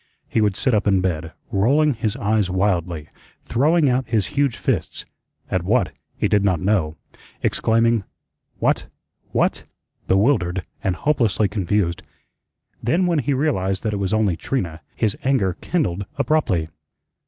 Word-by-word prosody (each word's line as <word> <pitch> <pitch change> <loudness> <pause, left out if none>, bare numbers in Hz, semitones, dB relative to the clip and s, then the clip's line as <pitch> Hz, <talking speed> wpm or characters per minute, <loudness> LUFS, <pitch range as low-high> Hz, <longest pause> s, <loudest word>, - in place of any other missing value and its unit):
He 110 - +1
would 105 -3 +2
sit 130 +4 +1
up 105 0 +2
in 95 -2 +4
bed, 80 -3 -2 0.2
rolling 140 +10 +3
his 110 -3 -2
eyes 105 -2 +1
wildly, 90 -5 -1 0.3
throwing 150 +6 +3
out 130 0 +1
his 110 -4 +2
huge 140 -4 +1
fists - - -2 0.5
at 95 - +1
what, 95 -2 +1 0.3
he - - +1
did 105 -1 +2
not 95 -5 +2
know 90 -5 0 0.5
exclaiming, 115 -1 +2 0.5
"What - - +1 0.4
what - - +1 0.2
" - - -43
bewildered 95 -4 +2 0.2
and 95 - +1
hopelessly 115 - +1
confused. 95 -3 0 0.8
Then 170 +10 +2
when 170 -3 +2
he 140 0 0
realized 95 -10 0
that 110 - -1
it - - -1
was 95 - -1
only 110 -5 +2
Trina, 85 -8 -3
his 110 -3 +1
anger 120 - +1
kindled 100 - -1
abruptly. 130 - +1
105 Hz, 145 wpm, -22 LUFS, 95-130 Hz, 0.8 s, in